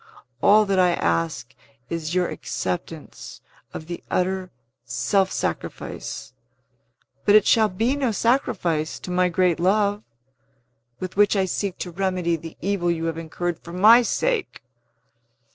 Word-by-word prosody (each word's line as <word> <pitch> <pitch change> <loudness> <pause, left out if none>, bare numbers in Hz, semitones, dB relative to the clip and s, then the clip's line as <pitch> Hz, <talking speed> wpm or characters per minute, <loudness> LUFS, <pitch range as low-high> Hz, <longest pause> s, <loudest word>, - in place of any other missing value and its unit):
All 215 +1 +6
that 195 -2 +1
I 180 -1 +4
ask 85 - -1 0.3
is 165 +2 -4
your 180 -1 +2
acceptance 165 -3 -5 0.3
of 155 - -7
the 175 +1 -7
utter 185 0 -1 0.3
self 130 - 0
sacrifice - - -5 0.9
(but 205 - +5
it 215 - +6
shall 220 -2 +4
be 225 +8 0
no 270 -5 0
sacrifice, 180 - 0
to 180 - -7
my 180 0 +2
great 175 -1 +1
love) 205 +3 +2 1.0
with 185 +1 -6
which 205 0 +4
I 195 -1 +2
seek 190 +1 -3
to 180 - -5
remedy 180 -2 0
the 165 0 -9
evil 190 -2 0
you 165 -1 -1
have 165 -1 -2
incurred 170 +1 -4
for 170 - -11
my 215 +7 +7
sake!" 465 - -1
185 Hz, 140 wpm, -23 LUFS, 170-205 Hz, 1.0 s, my